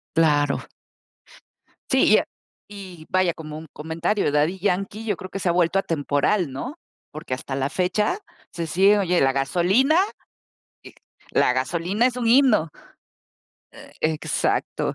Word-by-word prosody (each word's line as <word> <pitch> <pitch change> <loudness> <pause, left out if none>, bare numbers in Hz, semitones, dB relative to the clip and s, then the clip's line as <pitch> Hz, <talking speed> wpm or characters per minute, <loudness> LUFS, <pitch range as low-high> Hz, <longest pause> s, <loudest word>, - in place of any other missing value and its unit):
Claro. 145 -3 +2 1.3
Sí, - - +4
y - - +8
a - - 0 0.4
y 190 -6 -11
vaya, 185 -2 +2
como 155 -1 -8
un 160 - -10
comentario, 160 +3 -1
Daddy 155 +6 +1
Yankee 200 +3 -2
yo 205 -5 -1
creo 185 - -8
que 195 - -5
se 180 -2 0
ha - - +2
vuelto 175 +2 +2
atemporal, 155 +1 0
¿no? 255 - -6 0.3
Porque 155 -4 -5
hasta 130 +1 -6
la 135 +1 -1
fecha 190 - 0 0.3
se 170 -1 -4
sigue 195 +5 +4
oye, 180 -2 +1
La 135 0 +3
gasolina 185 - +2 0.9
Y - - -13 0.4
La - - +3
gasolina 170 - 0
es 250 -1 +1
un 240 -2 -2
himno. 235 - +4 1.0
Eh, - - -14
exacto. 155 -1 -1
175 Hz, 145 wpm, -23 LUFS, 155-200 Hz, 1.3 s, y